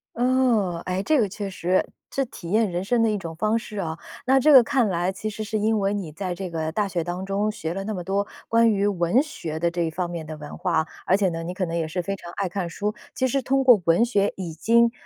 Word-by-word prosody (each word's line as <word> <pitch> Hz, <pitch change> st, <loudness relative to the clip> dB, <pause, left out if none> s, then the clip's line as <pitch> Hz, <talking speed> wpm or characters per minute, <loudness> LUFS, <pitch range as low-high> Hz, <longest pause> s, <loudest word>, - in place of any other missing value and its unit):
哦， 240 Hz, -8 st, +2 dB
哎， 185 Hz, +1 st, -1 dB
这 300 Hz, +8 st, +2 dB
个 220 Hz, -, +3 dB
确 200 Hz, +1 st, -5 dB
实， 185 Hz, 0 st, +1 dB, 0.3 s
这 275 Hz, -, 0 dB
体 175 Hz, -7 st, -9 dB
验 220 Hz, 0 st, +3 dB
人 175 Hz, +1 st, -2 dB
生 235 Hz, +4 st, +1 dB
的 225 Hz, -, +3 dB
一 210 Hz, -, 0 dB
种 165 Hz, -4 st, -6 dB
方 215 Hz, +6 st, +1 dB
式 215 Hz, -2 st, -7 dB
啊。 165 Hz, -4 st, -3 dB, 0.3 s
那 265 Hz, +1 st, +5 dB
这 300 Hz, +3 st, +5 dB
个 260 Hz, -3 st, +10 dB
看 245 Hz, -1 st, +2 dB
来 180 Hz, -1 st, 0 dB
其 195 Hz, +3 st, -5 dB
实 215 Hz, 0 st, -4 dB
是 215 Hz, +1 st, -2 dB
因 215 Hz, +1 st, +1 dB
为 195 Hz, 0 st, +1 dB
你 185 Hz, -6 st, -4 dB
在 185 Hz, +2 st, -4 dB
这 185 Hz, -1 st, -5 dB
个 160 Hz, -1 st, -2 dB
大 205 Hz, +4 st, 0 dB
学 175 Hz, -3 st, -2 dB
当 175 Hz, +3 st, -4 dB
中 200 Hz, +2 st, 0 dB
学 190 Hz, -6 st, -4 dB
了 195 Hz, +2 st, -4 dB
那 215 Hz, 0 st, -3 dB
么 180 Hz, -, -4 dB
多 200 Hz, +3 st, -1 dB, 0.2 s
关 230 Hz, 0 st, +4 dB
于 200 Hz, -1 st, +1 dB
文 190 Hz, -, +2 dB
学 165 Hz, -, -6 dB
的 170 Hz, +1 st, +1 dB
这 175 Hz, 0 st, -2 dB
一 165 Hz, -, +1 dB
方 175 Hz, +2 st, -2 dB
面 165 Hz, -2 st, -5 dB
的 155 Hz, 0 st, -6 dB
文 150 Hz, -1 st, -8 dB
化， 165 Hz, -3 st, 0 dB, 0.2 s
而 190 Hz, -, +4 dB
且 200 Hz, -2 st, +2 dB
呢， 165 Hz, -1 st, -4 dB
你 175 Hz, +2 st, -5 dB
可 185 Hz, -, -1 dB
能 165 Hz, -1 st, -4 dB
也 165 Hz, -2 st, -1 dB
是 170 Hz, +3 st, -4 dB
非 195 Hz, +2 st, -2 dB
常 175 Hz, -3 st, -10 dB
爱 195 Hz, -, -1 dB
看 180 Hz, -1 st, -3 dB
书， 205 Hz, +5 st, -2 dB, 0.2 s
其 260 Hz, -, +1 dB
实 270 Hz, +2 st, 0 dB
通 270 Hz, +1 st, +1 dB
过 245 Hz, -6 st, +7 dB
文 170 Hz, +8 st, +4 dB
学 205 Hz, -4 st, +1 dB
已 175 Hz, -4 st, -5 dB
经， 230 Hz, +8 st, +3 dB
195 Hz, 290 characters per minute, -24 LUFS, 175-220 Hz, 0.3 s, 个